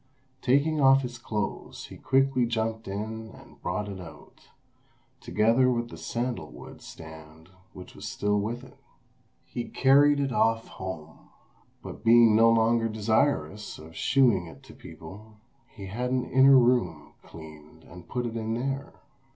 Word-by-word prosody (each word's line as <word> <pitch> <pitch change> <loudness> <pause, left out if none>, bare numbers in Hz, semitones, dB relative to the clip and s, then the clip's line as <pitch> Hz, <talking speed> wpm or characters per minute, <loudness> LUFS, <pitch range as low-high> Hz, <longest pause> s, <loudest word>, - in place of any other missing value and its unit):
Taking 145 +4 +2
off 135 0 +5
his 120 -1 -7
clothes 105 -3 -5
he - - -12
quickly 135 -2 +1
jumped 110 -1 -3
in 110 +3 -5
and - - -17
brought 105 +4 -3
it 100 -2 -7
out, 80 -2 -15 0.7
together 115 +4 +2
with 120 -1 -2
the - - -10
sandal 120 +9 -4
wood - - -12
stand 80 +1 -13 0.2
which 90 - -12
was - - -8
still 105 0 -1
with 115 +5 -4
it. - - -16 0.7
He 120 - -5
carried 145 +2 +4
it 140 -1 -1
off 115 -2 +1
home, 80 -4 -9 0.5
but - - -9
being 115 -1 +6
no 115 +1 +6
longer 115 0 +2
desirous 105 - -1
of 80 +1 -13
shewing 120 -10 +2
it 80 - -14
to - - -14
people, 105 +2 -13 0.3
he 100 -3 -11
had 120 +6 -3
an 125 -1 -1
inner 135 +1 +7
room 125 0 +1
cleaned 80 -2 -14
and 90 -1 -14
put 125 -1 -3
it 115 -1 -5
in 110 0 -2
there. 135 +3 -4
115 Hz, 150 wpm, -27 LUFS, 100-125 Hz, 0.7 s, inner